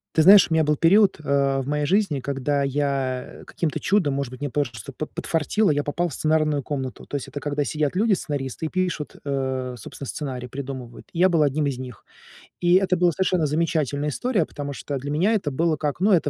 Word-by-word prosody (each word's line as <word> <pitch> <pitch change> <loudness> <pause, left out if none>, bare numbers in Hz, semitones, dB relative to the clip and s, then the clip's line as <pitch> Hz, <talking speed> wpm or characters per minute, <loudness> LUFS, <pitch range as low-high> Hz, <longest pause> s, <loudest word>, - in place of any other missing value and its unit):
Ты 160 - +5
знаешь, 195 +3 +8
у - - 0
меня 160 0 +4
был 150 0 +1
период, 195 +6 +5
а, 140 -1 +2
в 130 - -7
моей 150 0 0
жизни, 185 -5 +1
когда 140 +1 -1
я, 135 -2 -1 0.2
э, - - -13
каким-то 165 -4 -3
чудом, 185 -8 +2
может 140 -2 -3
быть, 130 - -10
мне 145 - -3
просто 125 -3 -3
под 155 +5 -6
подфартило, 170 +4 +1
я 145 0 0
попал 170 +5 -1
в 160 - -7
сценарную 155 -2 +1
комнату. 135 -3 -5
То - - -6
есть 135 - -7
это 145 - -7
когда 145 0 -1
сидят 155 +3 -1
люди, 220 +1 +3
сценаристы, 145 -3 -3
и - - -6
пишут, 180 -5 -2
э, 130 -2 -2
собственно, 140 - -8
сценарий, 130 -4 -4
придумывают. 130 -2 -7
И 170 - -6
я 185 - +6
был 165 -4 +3
одним 145 +1 +1
из 135 -3 -2
них. 125 -4 -9 0.5
И 175 0 +3
это 185 -1 +3
была 175 -1 +3
совершенно 185 -1 +1
замечательная 150 -2 0
история, 200 - 0
потому 145 -1 -6
что 140 +1 -4
для 140 +2 -5
меня 185 +9 +2
это 190 -9 0
было 160 +3 0
как, 150 +2 -3
ну, 205 +3 +4
это, 170 -6 +3
145 Hz, 220 wpm, -24 LUFS, 135-170 Hz, 0.5 s, знаешь